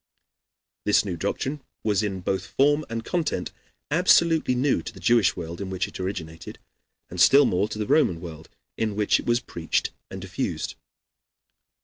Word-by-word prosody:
This 105 0 +3
new 95 -3 -3
doctrine 135 - -3 0.2
was 105 -2 +2
in 95 -3 -3
both 95 0 -2
form 145 +3 +2
and 115 0 -4
content 160 - -2 0.4
absolutely 165 -4 +4
new 130 +2 +1
to - - -7
the 100 - -13
Jewish 100 0 +3
world 85 +1 -6
in 95 - -4
which 95 -1 -2
it - - -10
originated, 85 -4 -6 0.5
and 90 0 -2
still 140 +1 +7
more 100 -1 +1
to - - -5
the 105 - -2
Roman 130 - +3
world 80 -2 -9 0.3
in 110 -2 -1
which 105 -1 +2
it - - -8
was 120 0 +3
preached 80 -1 -2 0.2
and - - -7
diffused. - - -3
105 Hz, 165 wpm, -25 LUFS, 90-130 Hz, 0.5 s, still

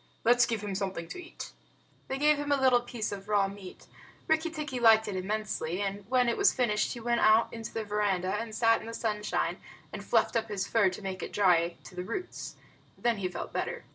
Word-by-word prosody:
Let's 240 +1 +5
give 225 -3 -2
him 205 -1 -3
something 190 -3 -3
to 360 - -7
eat." 340 - -9 0.6
They 265 - -2
gave 300 +1 +4
him 290 0 -3
a 285 - +3
little 255 -2 +4
piece 240 -3 -4
of 200 0 -7
raw 205 -2 +3
meat. 195 -2 -10 0.4
Rikki 315 +1 +2
tikki 300 -5 -4
liked 220 -2 +6
it 205 - -3
immensely, 190 -3 -2
and 200 0 -4
when 250 -1 +3
it 235 - +1
was 400 - +5
finished 215 -5 0
he 240 - -7
went 235 0 0
out 215 +1 +4
into 225 -1 -6
the 225 - -3
veranda 200 -3 0
and 220 0 -4
sat 225 0 +3
in - - -9
the 230 - -6
sunshine 210 -2 -1 0.4
and - - -6
fluffed - - +2
up 225 -1 0
his 205 -2 -2
fur 215 -4 +3
to 185 +3 -8
make 190 -1 -4
it - - -5
dry 175 -4 +3
to - - -12
the 180 - -4
roots. 360 - -6 0.4
Then 235 -2 +1
he 190 -2 -1
felt 180 - -6
better. - - -3
215 Hz, 225 wpm, -29 LUFS, 195-240 Hz, 0.6 s, liked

